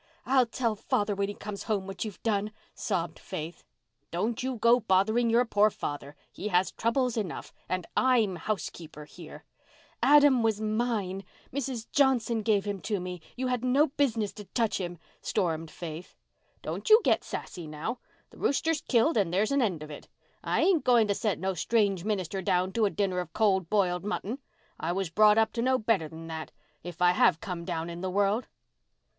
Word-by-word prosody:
"I'll 260 -2 +4
tell 230 -1 -1
father 205 0 0
when 200 0 -1
he 205 - -5
comes 205 -1 -7
home 205 -4 -1
what 195 -2 -5
you've 215 -4 -8
done," 210 -2 0 0.2
sobbed 175 -5 -3
Faith. 165 -2 -7 0.5
"Don't 215 +8 -2
you 260 0 -2
go 235 +2 +4
bothering 220 +3 +2
your 235 +2 +4
poor 210 -2 +4
father. 145 -6 -6 0.2
He 210 - -5
has 185 -2 +2
troubles 240 +1 0
enough. 200 -6 -4 0.2
And 185 -2 -2
I'm 230 -8 +3
housekeeper 165 -5 -5
here." 165 +1 -12 0.6
"Adam 290 -4 +6
was 220 -2 +1
mine—Mrs. 220 +3 -3
Johnson 245 -5 +2
gave 205 -2 +1
him 200 -2 -3
to 205 +2 -2
me. 180 -1 -6
You 260 - -3
had 250 -1 -1
no 275 +4 +3
business 230 -8 0
to 210 - -10
touch 225 +1 0
him," 175 -1 -5 0.2
stormed 165 -5 -1
Faith. 165 +1 -8 0.5
"Don't - - -4
you 435 +1 +9
get - - +2
sassy 175 -4 -6
now. 155 +11 -4 0.3
The - - -16
rooster's 320 +3 +1
killed 240 +5 +2
and 195 -5 +2
there's 200 +6 +1
an 280 0 +3
end 180 -10 -1
of 155 - -9
it. 145 - -10 0.4
I - - +1
ain't 370 -5 +3
going 240 -4 +4
to - - +3
set 205 -2 -1
no 190 +2 -1
strange 195 -1 +1
minister 195 -2 -2
down 185 +1 +1
to 225 0 +2
a - - +2
dinner 195 -2 -1
of 170 -3 -5
cold 190 -5 +2
b'iled 180 -4 +1
mutton. 210 +4 -3 0.4
I 170 +2 -1
was 190 -3 -2
brought 210 +3 +5
up 220 0 +3
to 230 - -1
know 260 +2 +3
better 215 -8 +1
than 165 +1 -10
that, 160 -1 -6 0.3
if 175 +1 -5
I 175 - +6
have 170 -2 +3
come 175 -3 -5
down 165 -2 -3
in 170 0 -7
the 190 - -2
world." 200 +5 +1
205 Hz, 185 wpm, -28 LUFS, 180-230 Hz, 0.6 s, you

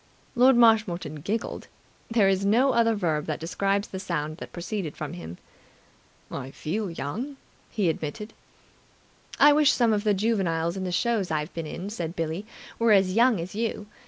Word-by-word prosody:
Lord 255 +1 +5
Marshmoreton 215 -10 +3
giggled. 220 +8 -3 0.4
There 225 -4 +3
is 195 0 +2
no 235 +7 +4
other 230 -1 +3
verb 160 -7 -1
that 155 -1 -2
describes 195 +5 -1
the 190 - -6
sound 155 -4 -3
that - - -9
proceeded 175 -2 -5
from 150 -2 -5
him. 85 0 -8 0.9
"I 135 -1 -5
feel 190 +9 -3
young," 210 - -5 0.3
he 205 -5 0
admitted. 165 +7 -3 1.1
"I 290 +1 +8
wish 295 -1 +5
some 235 -3 +2
of 205 -1 0
the 210 -2 +2
juveniles 185 -6 0
in 190 -1 -3
the 180 - -3
shows 215 0 0
I've 155 +2 -2
been 165 -2 -5
in," 185 +6 -6
said 170 -5 -4
Billie, 165 +5 -3 0.3
"were 230 -2 +4
as 190 -2 +4
young 235 -1 +4
as 170 +2 -6
you. 220 -1 -2
195 Hz, 170 wpm, -26 LUFS, 165-225 Hz, 1.1 s, I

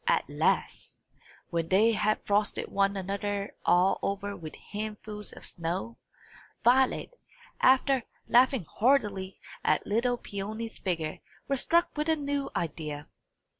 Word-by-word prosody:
At - - +2
last, - - -1 0.5
when 165 -1 0
they 205 +6 +5
had 215 0 0
frosted 205 +1 +1
one 200 0 +1
another 200 +1 -3
all 180 +2 +4
over 200 0 -2
with 160 -4 -8
handfuls 210 0 -6
of - - -11
snow, 165 -10 -4 0.7
Violet, 260 - +3 0.5
after 265 0 +4 0.3
laughing 250 - +4
heartily 205 -6 +1 0.2
at - - +2
little 240 +4 +1
Peony's 215 +2 -5
figure, 165 -5 -2 0.3
was 275 -2 +1
struck 340 +1 +2
with 300 +1 -1
a 320 - +4
new 285 -2 -2
idea. 150 -3 -4
205 Hz, 125 wpm, -29 LUFS, 190-245 Hz, 0.7 s, they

